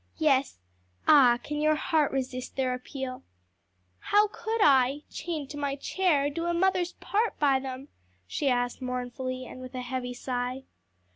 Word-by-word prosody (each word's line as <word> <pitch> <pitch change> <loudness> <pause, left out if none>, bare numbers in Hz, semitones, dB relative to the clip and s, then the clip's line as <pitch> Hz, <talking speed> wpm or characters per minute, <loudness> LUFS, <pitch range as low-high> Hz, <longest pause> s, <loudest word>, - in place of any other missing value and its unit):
"Yes. 280 - +2 0.5
Ah, 255 -5 +7
can 295 0 -3
your 310 0 +4
heart 305 -1 +1
resist 255 -1 -3
their 260 -1 0
appeal?" 255 0 -6 0.8
"How 415 0 +3
could 445 +2 -3
I, 275 - +4
chained 310 -4 -4
to 295 - -7
my 285 -1 -1
chair, 295 -1 +1
do 335 +3 -3
a 345 0 0
mother's 365 0 +1
part 435 +3 -1
by 275 -3 +3
them?" 265 +1 -6 0.4
she 275 - -1
asked 245 0 0
mournfully, 255 0 -4
and 255 - -10
with 255 0 -9
a 255 - -3
heavy 250 0 -4
sigh. 250 +1 -3
270 Hz, 155 wpm, -28 LUFS, 255-310 Hz, 0.8 s, Ah